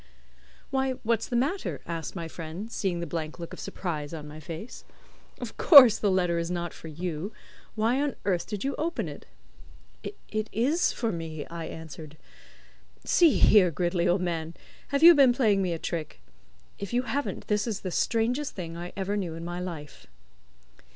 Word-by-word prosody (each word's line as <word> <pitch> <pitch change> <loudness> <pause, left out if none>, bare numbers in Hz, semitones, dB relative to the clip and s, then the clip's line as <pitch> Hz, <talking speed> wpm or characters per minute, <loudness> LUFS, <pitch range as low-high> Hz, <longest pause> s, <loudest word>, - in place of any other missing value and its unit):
"Why, 265 -1 +1
what's 225 -1 +1
the 245 - -3
matter?" 285 +11 -1
asked 165 0 -5
my 170 -2 -4
friend, 165 +7 -7
seeing 180 -6 -1
the - - -2
blank 160 -1 -4
look 170 -1 -8
of - - -8
surprise 155 -4 -4
on 150 -2 -8
my 150 +1 -9
face. 165 +9 -8 0.6
"Of - - -7
course 260 - +9
the 205 - +2
letter 180 -3 +1
is 170 0 -2
not 175 -1 -3
for - - -11
you; 170 +4 -4 0.4
why 230 +5 +1
on 290 -1 -1
earth 180 -4 0
did 210 -2 -4
you 275 +1 -1
open 330 - -1
it?" 145 - -10 0.7
"It 215 - -5
is 280 - +2
for 230 -2 -2
me," 160 -3 -5
I 165 -1 -6
answered. 155 -1 -9 0.9
"See 335 -4 +5
here, 195 -4 +6
Gridley, 175 +2 0
old 180 +2 +2
man; 165 -2 -3 0.3
have 280 +2 0
you 345 +1 +11
been 275 -5 +6
playing 215 -6 +3
me 185 -2 0
a 165 - -1
trick? 160 - -5 0.6
If 200 +3 -6
you 245 +1 +2
haven't, 280 +2 -3
this 210 +2 0
is 215 -3 -3
the 185 - -4
strangest 240 +9 0
thing 165 -3 -6
I 175 +1 -7
ever 195 +1 -1
knew 180 -6 -3
in 165 0 -7
my 175 +1 -4
life." 165 -5 -7
180 Hz, 180 wpm, -27 LUFS, 165-230 Hz, 0.9 s, you